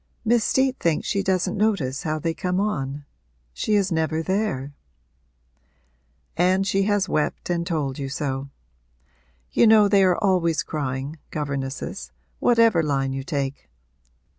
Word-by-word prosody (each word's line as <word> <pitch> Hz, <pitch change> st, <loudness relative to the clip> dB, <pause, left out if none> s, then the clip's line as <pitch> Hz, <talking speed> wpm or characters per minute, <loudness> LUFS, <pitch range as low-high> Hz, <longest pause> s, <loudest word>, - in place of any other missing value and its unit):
'Miss 235 Hz, 0 st, +3 dB
Steet 265 Hz, +3 st, +1 dB
thinks 165 Hz, -2 st, 0 dB
she 200 Hz, -, 0 dB
doesn't 190 Hz, 0 st, 0 dB
notice 195 Hz, -11 st, 0 dB
how 155 Hz, 0 st, -2 dB
they 165 Hz, +2 st, -2 dB
come 180 Hz, +2 st, -1 dB
on 145 Hz, -8 st, -2 dB, 0.5 s
she 210 Hz, -, 0 dB
is 200 Hz, -2 st, +1 dB
never 160 Hz, 0 st, 0 dB
there.' 185 Hz, -8 st, -1 dB, 1.6 s
'And 185 Hz, +3 st, +2 dB
has 195 Hz, +1 st, +2 dB
she -, -, -9 dB
wept 155 Hz, +3 st, -1 dB
and 170 Hz, -1 st, -1 dB
told 150 Hz, -5 st, -2 dB
you 135 Hz, -1 st, -3 dB
so? 140 Hz, -2 st, -3 dB, 1.0 s
You 235 Hz, -, +4 dB
know 215 Hz, -1 st, +6 dB
they 200 Hz, -1 st, +4 dB
are 185 Hz, -2 st, +3 dB
always 180 Hz, -7 st, +1 dB
crying, 140 Hz, 0 st, -4 dB
governesses 135 Hz, -, -4 dB, 0.3 s
whatever 230 Hz, -7 st, +4 dB
line 135 Hz, -3 st, -1 dB
you 135 Hz, 0 st, -4 dB
take. 140 Hz, -, -4 dB
165 Hz, 140 wpm, -23 LUFS, 140-195 Hz, 1.6 s, know